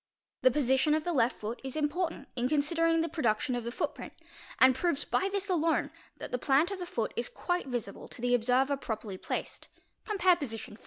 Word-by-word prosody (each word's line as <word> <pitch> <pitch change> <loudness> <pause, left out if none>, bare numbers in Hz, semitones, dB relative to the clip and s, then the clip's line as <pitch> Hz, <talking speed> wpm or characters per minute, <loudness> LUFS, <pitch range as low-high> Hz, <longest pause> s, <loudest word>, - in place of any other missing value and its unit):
The 255 - +6
position 265 +3 +2
of 310 - -1
the 350 - -1
left 245 -3 +2
foot 220 +3 -6
is 265 +1 -5
important 310 0 -1
in 250 0 0
considering 330 +3 +2
the 330 - 0
production 255 -6 0
of 245 -1 -2
the 235 - -4
footprint - - -4 0.4
and 260 0 +7
proves 285 +2 0
by 385 - +1
this 400 0 -1
alone 330 -4 +1 0.3
that - - -7
the 250 - -1
plant 290 +8 +3
of 395 - -4
the 355 - -5
foot 225 -9 -2
is 235 0 -2
quite 355 -4 -2
visible 235 -6 -5
to - - -7
the 245 +1 +1
observer 255 +4 +3
properly 215 -6 -5
placed - - -4 0.4
(compare 375 -4 +3
position 225 -10 -6
IV.) 215 - -14
275 Hz, 205 wpm, -30 LUFS, 245-330 Hz, 0.4 s, and